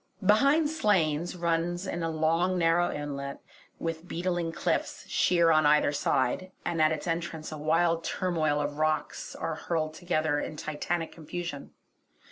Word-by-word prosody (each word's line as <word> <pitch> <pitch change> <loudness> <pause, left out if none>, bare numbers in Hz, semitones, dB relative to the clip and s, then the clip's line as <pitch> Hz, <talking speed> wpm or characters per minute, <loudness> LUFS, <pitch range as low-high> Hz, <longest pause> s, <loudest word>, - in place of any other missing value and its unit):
Behind 275 +10 +5
Slains 180 - +1
runs 170 +1 -1
in 175 -2 -3
a 165 - -1
long 165 +3 +1
narrow 170 0 +3
inlet 140 -1 -5 0.4
with 165 +1 -4
beetling 175 -1 -1
cliffs, - - -2
sheer 170 -2 +3
on 155 -1 +5
either 150 -1 +4
side, 145 +5 0
and 170 -2 0
at 155 0 +5
its 160 - -3
entrance 165 -2 -3
a 155 - -5
wild 165 +2 +2
turmoil 160 -5 0
of 145 0 -3
rocks 155 -1 -1
are 165 - -3
hurled 155 0 -2
together 155 -3 0
in 155 - -4
titanic 160 +2 -3
confusion. 165 -2 -6
165 Hz, 145 wpm, -28 LUFS, 155-175 Hz, 0.4 s, Behind